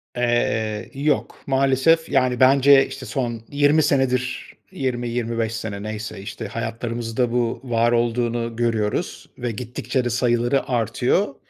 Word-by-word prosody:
Eee, 110 -3 0
yok, 145 +2 -1
maalesef. 135 +4 +3
Yani, 125 -1 +2
bence, 135 +1 +6
işte, 135 -1 -8
son 120 -5 -3
20 145 +2 +3
senedir, 130 -3 0 0.2
20-25 120 -3 -2
sene, 105 -3 -5
neyse 110 -1 -5
işte, 105 +3 -6
hayatlarımızda 115 +1 -3
bu 120 -1 -1
var 120 -2 +1
olduğunu 120 0 0
görüyoruz 115 -3 -1
ve 120 -1 -3
gittikçe 125 +3 -3
de - - 0
sayıları 120 +2 +1
artıyor. 125 - 0
120 Hz, 120 wpm, -22 LUFS, 115-130 Hz, 0.2 s, bence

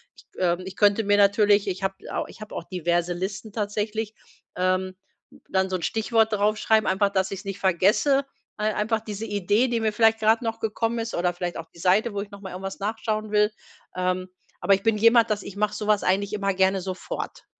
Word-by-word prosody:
ich - - -18 0.2
ähm 175 -1 +2
ich 190 0 -8
könnte 205 +1 +3
mir 205 0 +3
natürlich 205 0 +4
ich 190 0 -3
habe 195 0 -1 0.2
au - - -1
ich - - -14
habe 215 - -8
auch - - -4
diverse 175 -1 -1
Listen 195 +4 -5
tatsächlich, 210 +1 -3 0.4
ähm, 185 +1 0 0.5
dann 190 0 +1
so 190 - -1
'n - - -10
Stichwort 225 0 +1
draufschreiben, 215 +1 +2
einfach, 195 +2 +2
dass 190 -1 0
ich 195 - -4
es 195 - -13
nicht 195 0 -5
vergesse. 210 - +3 0.3
Ei 215 0 0
einfach 220 +1 0
diese 215 0 -6
Idee, 205 +4 +1
die 240 -2 0
mir 220 -1 +1
vielleicht 225 +1 +3
grad 220 +2 +3
noch 225 -1 -3
gekommen 225 +2 -1
ist 225 0 -3
oder 175 0 0
vielleicht 175 0 -4
auch 165 - -6
die - - -16
Seite, 200 +6 +2
wo 200 - -2
ich 200 - -8
noch 200 -1 -12
mal 190 -2 -7
irgendwas 195 +1 -6
nachschauen 215 +1 -3
will. 210 0 +3 0.4
Ähm, 185 0 -1 0.3
aber 200 - +5
ich 195 - -7
bin 225 -1 +3
jemand, 230 0 +5
dass 210 -1 0
ich 200 - -9
mache 210 +1 0
so 210 - -5
was 210 -1 +3
eigentlich 195 +2 +1
immer 200 -1 0
gerne 190 0 +2
sofort. 190 - -6
205 Hz, 220 wpm, -25 LUFS, 190-220 Hz, 0.5 s, aber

